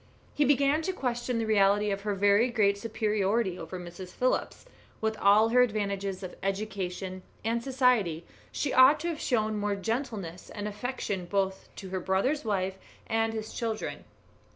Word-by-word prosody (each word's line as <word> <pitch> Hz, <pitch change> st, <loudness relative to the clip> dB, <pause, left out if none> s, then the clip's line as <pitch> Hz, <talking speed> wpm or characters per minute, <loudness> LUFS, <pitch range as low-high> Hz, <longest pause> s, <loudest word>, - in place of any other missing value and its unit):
He 295 Hz, -, +2 dB
began 280 Hz, +2 st, +3 dB
to 375 Hz, +4 st, -2 dB
question 245 Hz, -5 st, -2 dB
the 225 Hz, -, 0 dB
reality 205 Hz, -1 st, +3 dB
of 195 Hz, 0 st, -2 dB
her 205 Hz, 0 st, -1 dB
very 205 Hz, +5 st, +4 dB
great 210 Hz, -4 st, +3 dB
superiority 210 Hz, -2 st, 0 dB
over 170 Hz, +3 st, -6 dB
Mrs. 175 Hz, +1 st, -8 dB
Phillips; 255 Hz, -, -1 dB, 0.3 s
with 220 Hz, 0 st, 0 dB
all 210 Hz, +3 st, +5 dB
her 250 Hz, +2 st, +5 dB
advantages 200 Hz, -4 st, -1 dB
of 185 Hz, -, -7 dB
education 195 Hz, -2 st, -3 dB, 0.2 s
and 230 Hz, +1 st, 0 dB
society 245 Hz, -, +2 dB, 0.3 s
she 285 Hz, -, -2 dB
ought 260 Hz, +4 st, +7 dB
to 340 Hz, -, -1 dB
have 320 Hz, -3 st, -4 dB
shown 215 Hz, -4 st, 0 dB
more 205 Hz, 0 st, 0 dB
gentleness 205 Hz, -5 st, -4 dB
and 205 Hz, -1 st, -5 dB
affection 210 Hz, -4 st, -4 dB
both 195 Hz, 0 st, -1 dB
to 190 Hz, -, -8 dB
her 190 Hz, 0 st, -2 dB
brother's 195 Hz, -, 0 dB
wife 190 Hz, -3 st, -1 dB, 0.3 s
and 225 Hz, 0 st, 0 dB
his 220 Hz, -1 st, -5 dB
children. 225 Hz, -2 st, -3 dB
210 Hz, 160 wpm, -29 LUFS, 195-235 Hz, 0.3 s, ought